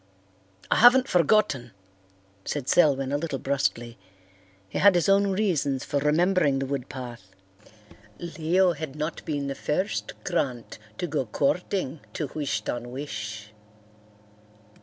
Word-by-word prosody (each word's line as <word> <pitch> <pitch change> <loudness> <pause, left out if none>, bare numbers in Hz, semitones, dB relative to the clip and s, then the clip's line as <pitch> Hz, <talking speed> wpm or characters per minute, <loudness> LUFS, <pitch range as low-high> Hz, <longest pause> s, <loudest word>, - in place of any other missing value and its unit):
"I - - +4
haven't 250 +2 +7
forgotten," 170 - +2 0.7
said 140 +3 -4
Selwyn, 140 -6 +3
a 145 - 0
little 150 -3 -3
brusquely. 120 -4 -2 0.7
He 95 - -4
had 200 -2 +6
his 175 - +2
own 200 +1 +4
reasons 170 -9 0
for 145 - -1
remembering 155 0 +2
the 135 - -1
wood 135 -2 -4
path. 120 -8 -9 0.8
Leo 170 +2 +1
had 150 -3 -6
not 155 +2 -4
been 145 -3 -2
the 140 - -2
first 150 +8 -2
Grant 130 -12 -2 0.2
to - - -2
go 145 -6 -2
courting 155 - -1
to 150 -4 -4
Wish 150 -3 -2
ton 120 0 -4
wish. 105 -6 -6
145 Hz, 130 wpm, -26 LUFS, 130-175 Hz, 0.8 s, haven't